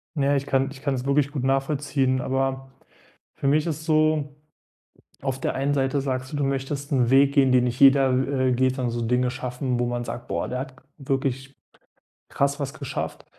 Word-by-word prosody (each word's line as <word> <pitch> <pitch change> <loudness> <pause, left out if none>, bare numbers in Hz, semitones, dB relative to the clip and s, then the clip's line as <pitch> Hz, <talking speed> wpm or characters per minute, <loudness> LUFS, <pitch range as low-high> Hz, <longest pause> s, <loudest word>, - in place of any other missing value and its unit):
Naja, 140 -1 +2
ich 140 0 -1
kann 135 +1 +1
ich 135 -1 -12
kann 140 -2 -1
es 125 +1 -5
wirklich 140 0 +2
gut 135 -4 -3
nachvollziehen, 135 -1 0
aber 135 0 -2 0.6
für 140 - -2
mich 150 +2 +3
ist 155 -2 -2
es - - -11
so 155 -2 +1 0.9
auf 135 -1 -3
der - - -1
einen 140 +2 0
Seite 135 0 +1
sagst 130 0 -3
du, 145 - -3
du 145 - 0
möchtest 135 +1 -3
'n 125 -4 +2
Weg 140 +1 +5
gehen, 135 -3 +4
den 125 -1 +4
nicht 125 0 -2
jeder, 135 -1 +6
w 130 0 +1
äh, - - +2
geht 130 +1 +1
sondern 125 -3 -2
so 120 0 -3
Dinge 125 +2 +1
schaffen, 125 0 -3
wo 120 - +1
man 120 0 -2
sagt: 120 0 -7
„Boah, - - -2
der 125 +1 -3
hat 135 0 -6 0.3
wirklich 135 0 -2 0.7
krass 140 +1 0
was 140 0 -3
geschafft.“ 140 -4 -5
135 Hz, 205 wpm, -24 LUFS, 130-140 Hz, 0.9 s, jeder